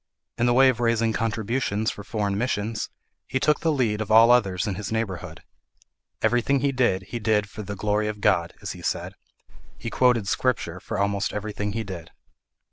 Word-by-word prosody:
In 120 - +3
the 120 - +4
way 135 +1 +7
of 125 -3 0
raising 115 -1 +2
contributions 110 -1 -1
for 105 - -9
foreign 100 -1 -2
missions, 110 -1 -2 0.4
he 130 - -1
took 150 +2 +2
the 165 - +1
lead 115 -7 0
of 110 - -4
all 115 +2 +7
others 100 -6 +3
in 105 - -1
his 100 +2 -5
neighbourhood. 110 -5 -4 0.8
Everything 125 +3 +2
he 140 - +2
did, 120 -8 +1
he 120 - -4
did 105 -1 +1
for 105 - -8
the 100 0 -5
"glory 105 +2 0
of 105 -1 -4
God," 85 -4 +1
as - - -3
he - - -9
said: - - -2 0.6
he 115 - -6
quoted 120 -3 +3
Scripture 95 -7 0
for 110 - -5
almost 100 0 0
everything 105 -1 -3
he 115 +1 -2
did. 90 -5 -8
110 Hz, 190 wpm, -25 LUFS, 100-120 Hz, 0.8 s, way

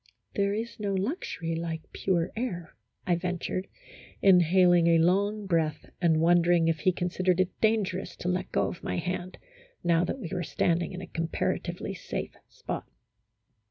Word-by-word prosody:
" - - -36
There 200 0 +1
is 225 +2 -5
no 200 -2 -1
luxury 190 - -2
like 165 -1 -5
pure 175 -3 0
air," 195 -8 -4 0.3
I 180 - +2
ventured, 180 +1 -3 0.5
inhaling 180 -2 +5
a 165 -1 +5
long 200 +5 +2
breath 160 -4 -1
and 165 -3 +4
wondering 170 0 +4
if 165 -1 +1
he 185 - +3
consid 180 +1 -3
ered 180 0 +4
it 185 -1 -1
dangerous 205 -4 +1
to - - -6
let 180 +1 -1
go - - +2
of 175 - -6
my - - -2
hand, 180 +1 -3 0.5
now 170 -1 +3
that 175 - -3
we 185 -8 -6
were 180 - -1
standing 170 +2 0
in 185 - -6
a - - -6
comparatively 165 0 -2
safe - - -5
spot. - - -6
180 Hz, 165 wpm, -28 LUFS, 170-190 Hz, 0.5 s, inhaling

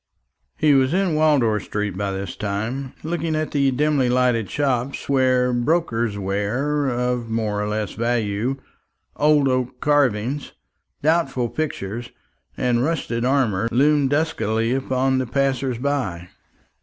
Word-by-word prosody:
He 150 -2 +4
was 135 +3 +3
in 190 -3 +1
Wardour 145 -9 +3
street 105 -1 -3
by 100 +1 -2
this 95 -1 -4
time, 110 +6 -3
looking 160 0 -2
at 155 0 -2
the 140 -2 +2
dimly 140 -1 +1
lighted 125 -4 +2
shops 135 -2 -1
where 130 -2 +2
brokers' 120 -5 0
ware 120 +10 -1
of 125 -1 -1
more 110 -2 -1
or 105 - -2
less 105 -1 -2
value, 115 +1 -1 0.6
old 150 -1 +3
oak 130 -1 -1
carvings, 140 -2 +1 0.5
doubtful 140 -6 +1
pictures, 120 -7 -4 0.5
and 120 -1 +1
rusted 135 -6 -1
armour 120 -6 +1
loomed 140 +3 +3
duskily 125 -7 0
upon 130 0 0
the 130 - -2
passer 135 0 0
by. 115 -10 -2
125 Hz, 130 wpm, -22 LUFS, 115-145 Hz, 0.6 s, He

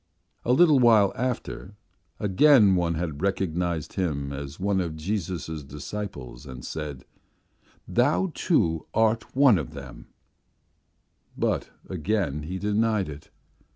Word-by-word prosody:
A 120 - +1
little 150 +1 +6
while 110 -5 +5
after 120 -5 -4 0.4
again 105 +3 +5
someone 85 -4 0
recognized 90 -4 -1
him 70 -7 -2
as 70 +3 -7
one 95 0 +1
of 85 -3 -4
Jesus' 80 -2 -3
disciples 70 -3 -7
and 65 -1 -8
said: 75 -4 -6 0.8
'Thou, 145 +9 +2
too, 80 - +1
art 110 +1 +1
one 130 -8 +6
of 70 -6 -6
them,' - - -10 1.3
but - - 0 0.2
again 90 -4 -1
he 90 +5 -5
denied 105 -1 +1
it. 75 0 -10
95 Hz, 115 wpm, -26 LUFS, 75-110 Hz, 1.3 s, little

